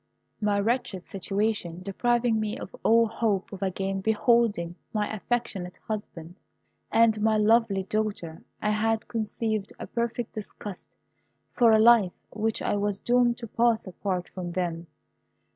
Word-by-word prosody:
My 205 -1 +2
wretched 210 -4 -1
situation 195 -2 -2
depriving 235 +3 +1
me 215 -1 -2
of - - -8
all 230 +1 +5
hope 215 -3 -1
of 195 - -8
again 195 0 -2
beholding 220 -4 +2 0.2
my 210 -1 0
affectionate 215 -5 -3
husband 180 -5 -6 0.5
and 225 -2 +4
my 220 0 +3
lovely 215 -2 +3
daughter, 200 -5 -3 0.2
I 210 - +2
had 220 +1 0
conceived 220 -2 -2
a - - -5
perfect 235 0 -3
disgust 205 -2 -8 0.7
for 235 -2 +5
a 220 - +6
life 220 -5 +6 0.2
which 220 +1 -1
I - - +1
was 205 -1 -1
doomed 240 -1 +3
to 235 - -7
pass 230 +1 +2
apart 185 -1 -3
from 175 -2 -5
them. 170 -2 -2
215 Hz, 140 wpm, -27 LUFS, 195-230 Hz, 0.7 s, a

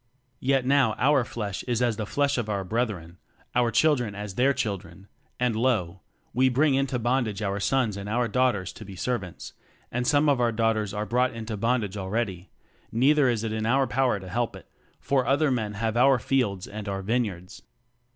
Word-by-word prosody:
Yet 135 -1 +1
now 135 -5 +3
our 140 0 +3
flesh 105 -5 -4
is 120 -2 0
as 120 -2 +1
the 110 - -3
flesh 140 0 +1
of 110 -2 -3
our 100 -2 -1
brethren, 95 -5 -3 0.3
our 120 -1 +3
children 120 -3 +2
as 105 -1 -6
their 130 +7 +3
chil 105 -7 -1
dren: 90 +4 -16 0.3
and 125 -2 +1
lo, 105 -7 0 0.3
we 130 +3 +3
bring 140 +3 +3
into 135 -1 0
bondage 120 -3 0
our 100 0 -1
sons 120 -1 +1
and 100 +1 -6
our 120 +2 +1
daughters 115 -5 0
to - - -10
be 100 -2 -10
ser 125 +6 -1
vants, 90 -4 -10 0.4
and 125 +1 -1
some 145 +1 +3
of 140 -4 +3
our 120 -1 +3
daughters 110 -2 0
are 105 +1 -3
brought 125 +2 +1
into 110 -1 -5
bondage 105 -2 0
already: 95 -1 -3 0.4
neither 135 +3 +4
is 115 -2 -1
it 110 -1 -2
in 110 0 -2
our 135 +3 +3
power 130 -5 +1
to 95 - -10
help 115 +5 -2
it; - - -12 0.3
for 130 -3 0
other 145 +1 +3
men 110 -4 -2
have 110 +1 -1
our 130 +2 +5
fields 110 -6 0
and 105 0 -6
our 95 0 -3
vineyards. 100 -5 -2
115 Hz, 200 wpm, -26 LUFS, 100-130 Hz, 0.4 s, our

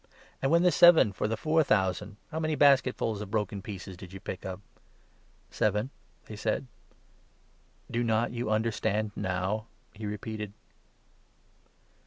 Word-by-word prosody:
" - - -28
And 135 - +1
when 170 +1 +5
the 180 - +5
seven 170 - +7
for 100 - -1
the 110 0 -2
four 160 +1 +2
thousand, 100 -2 0
how 160 - -3
many 155 -1 0
basketfuls 130 -7 +3
of 105 - -6
broken 105 -2 -2
pieces 95 -2 -7
did 90 0 -11
you 95 - -7
pick 95 0 -6
up? 95 0 -5 0.4
" - - -35
" - - -35
Seven," 105 +5 0 0.3
they 110 - -8
said. 110 +5 -1 0.6
" - - -26
Do 120 +1 0
not 115 0 +1
you 120 -1 -3
understand 110 -1 0
now? 95 +4 -2
" - - -38
he 105 0 -6
repeated. 105 0 -5
110 Hz, 165 wpm, -29 LUFS, 100-120 Hz, 0.6 s, seven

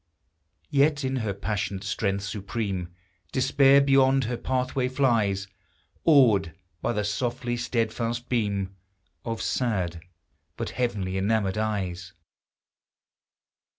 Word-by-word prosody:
Yet 145 +1 +3
in 130 0 -1
her 110 -4 -1
passionate 100 -1 -3
strength 100 -2 -1
supreme, 100 -3 -3 0.4
Despair 135 +1 +5
beyond 135 -1 +4
her 120 +1 -2
pathway 130 +1 -1
flies, 115 -7 +1 0.6
Awed 110 - +5 0.3
by - - 0
the 105 -3 -1
softly 120 +4 -2
steadfast 120 0 -2
beam 100 -5 -1 0.5
Of 115 -1 -3
sad, 90 -9 -1 0.6
but 115 - -3
heaven 110 -7 -1
enamored 95 +1 0
eyes 95 -5 -3
115 Hz, 100 wpm, -26 LUFS, 100-130 Hz, 0.6 s, Despair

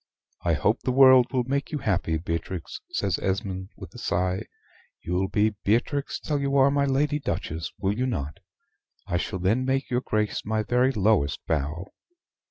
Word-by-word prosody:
"I 85 - +2
hope 105 - +1
the 130 - -1
world 130 -2 +7
will 125 -1 +1
make 140 +3 -2
you 150 - -1
happy, 90 - 0
Beatrix," 85 +1 -4
says - - 0
Esmond, 95 -1 -2
with - - -10
a - - -10
sigh. 90 +1 -1 0.6
"You'll 90 +3 0
be 105 +2 +1
Beatrix 120 +7 0
till 150 -2 -2
you 140 0 +1
are 135 +1 +5
my 140 0 +2
Lady 145 +2 +1
Duchess 85 - -3
will 100 +1 0
you 130 +3 0
not? 75 - -4 0.7
I 90 - -1
shall 90 - -3
then 100 +8 +1
make 135 +1 -1
your 125 0 +1
Grace 105 -3 -1
my 110 +1 -1
very 125 +3 +2
lowest 100 - +1
bow." 80 +4 -2
110 Hz, 175 wpm, -26 LUFS, 90-130 Hz, 0.7 s, world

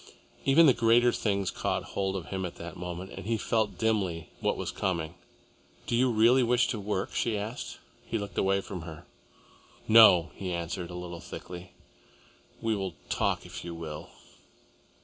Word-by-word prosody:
Even 145 +5 +7
the 135 - +7
greater 120 +1 +4
things 100 -5 0
caught - - -1
hold 95 -1 -1
of 95 - -5
him 95 -1 -3
in 90 - -3
that 85 +1 -8
moment, 90 +1 -6
and 95 +1 -8
he 115 0 +1
felt 110 -1 0
dimly 95 -8 0
what - - 0
was - - -3
coming. 85 -3 -2 0.7
"Do - - 0
you 125 +2 +4
really 120 +3 +5
wish 120 0 +3
to 110 - -2
work?" 100 -1 -2
she 115 -3 0
asked. 110 +4 -5 0.3
He 115 - -2
looked 100 -1 -6
away 95 0 +2
from 95 -2 -7
her. 80 -1 -9 0.8
"No!" 110 -7 +8
he 95 -2 -5
answered, 85 0 -3
a 90 - -7
little 90 -1 -6
thickly. 90 0 -9 0.9
"We 115 -1 +1
will 95 -3 -3
talk, - - 0
if - - -8
you 85 -1 -6
will." 80 -2 -7
95 Hz, 170 wpm, -29 LUFS, 90-115 Hz, 0.9 s, No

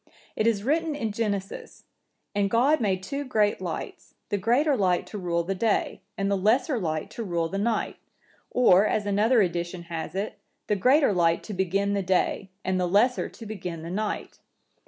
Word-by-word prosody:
It 215 - +1
is 210 -3 +1
written 310 +4 0
in 225 -7 -2
Genesis,(967) 205 -3 -4 0.5
'And 200 -1 +1
God 255 +7 +3
made 190 -3 0
two 280 +8 -3
great 210 -7 +1
lights; 170 -4 -6
the 205 - 0
greater 260 +9 +2
light 185 -6 +1
to 210 - -7
rule 170 -2 0
the 190 +3 -2
day, 210 +2 0 0.2
and 195 0 0
the - - +3
lesser 235 - +2
light 155 -5 -3
to 230 - -5
rule 170 -4 -1
the 195 +4 -3
night.' 225 +2 -1 0.5
Or, 215 -5 +5
as 210 - 0
another 210 +1 +3
edition(968) 175 0 -5
has 165 0 -6
it, 200 +3 -3 0.3
'The 210 - +1
greater 260 +3 +4
light 170 -2 +2
to 215 - -6
begin 195 +2 0
the 200 - 0
day, 190 +1 0 0.2
and 185 0 0
the 180 - +1
lesser 225 +7 +2
to 225 - -12
begin 180 -6 -6
the 170 - -6
night. 210 +3 -3
200 Hz, 185 wpm, -26 LUFS, 180-230 Hz, 0.5 s, Or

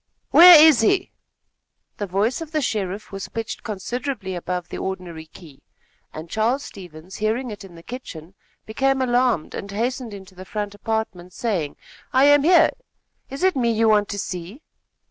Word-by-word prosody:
"Where 345 -1 +10
is 305 -6 +7
he?" 375 - +1 0.9
The 205 - -4
voice 205 - -1
of 325 -1 -8
the 310 - +1
sheriff 205 -3 -3
was 195 -1 -7
pitched 225 -1 -5
considerably 225 0 -5
above 180 0 -4
the - - -6
ordinary 175 -4 -6
key, 155 -4 -16 0.5
and 155 +2 -8
Charles 230 +8 0
Stevens, 180 -1 -11
hearing 225 +3 -1
it 205 -1 -9
in 185 -3 -13
the 165 - -14
kitchen, 180 -9 -9 0.3
became 270 +5 0
alarmed, 245 -8 +1
and 200 - -6
hastened 235 +2 -3
into 190 -1 -13
the 185 0 -10
front 205 +1 -5
apartment, 205 -4 -4
saying: 185 -11 -2 0.4
"I 260 +1 +4
am 290 0 +6
here. 345 +4 +5 0.6
Is 275 +5 -6
it 375 -3 +3
me 240 -3 +1
you 225 0 +2
want 210 -1 +3
to 205 - -4
see?" 190 - -6
215 Hz, 165 wpm, -22 LUFS, 185-255 Hz, 0.9 s, Where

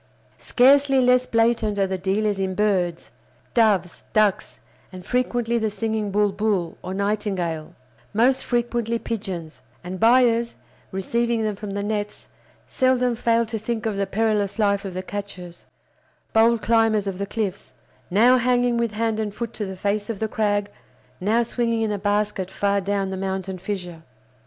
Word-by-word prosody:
Scarcely 275 +1 +4
less 250 0 +3
blatant 225 -2 +1
are 195 - +3
the 190 0 -2
dealers 200 +2 0
in 190 -1 -1
birds—doves, 190 +1 -1
ducks, 210 -3 +1 0.3
and 185 -1 -10
frequently 240 -2 0
the 220 -1 0
singing 215 0 -2
bulbul, 200 -3 0
or 185 - -5
nightingale, 195 -6 -2 0.4
most 250 +5 +2
frequently 235 -1 -1
pigeons; 185 - -5 0.2
and 180 +1 -6
buyers, 235 0 +4 0.4
receiving 230 +4 0
them 215 -1 -1
from 200 0 -6
the 200 - -2
nets, 210 0 -4 0.4
seldom 250 -2 +2
fail 230 0 +2
to 220 0 -4
think 225 +1 -3
of 220 -2 -1
the 195 0 -1
perilous 215 -2 0
life 200 -2 +1
of 190 -2 -6
the 185 - -3
catchers, 185 -3 -8 0.7
bold 225 0 +4
climbers 225 -2 +3
of 195 -1 -4
the 200 - -2
cliffs; 200 -3 -4 0.3
now 235 +7 +5
hanging 245 0 +2
with 235 -2 -1
hand 225 0 -1
and 210 -2 -3
foot 235 -1 -5
to 210 - -4
the 190 -1 -7
face 205 +2 -1
of 225 - -3
the 220 - -1
crag, 205 -1 0 0.5
now 220 +5 +2
swinging 230 -1 -1
in 220 - 0
a 205 - -2
basket 205 -2 -1
far 200 +1 0
down 195 0 -1
the 190 - -4
mountain 190 -1 -3
fissure. 180 -3 -5
210 Hz, 155 wpm, -23 LUFS, 195-230 Hz, 0.7 s, now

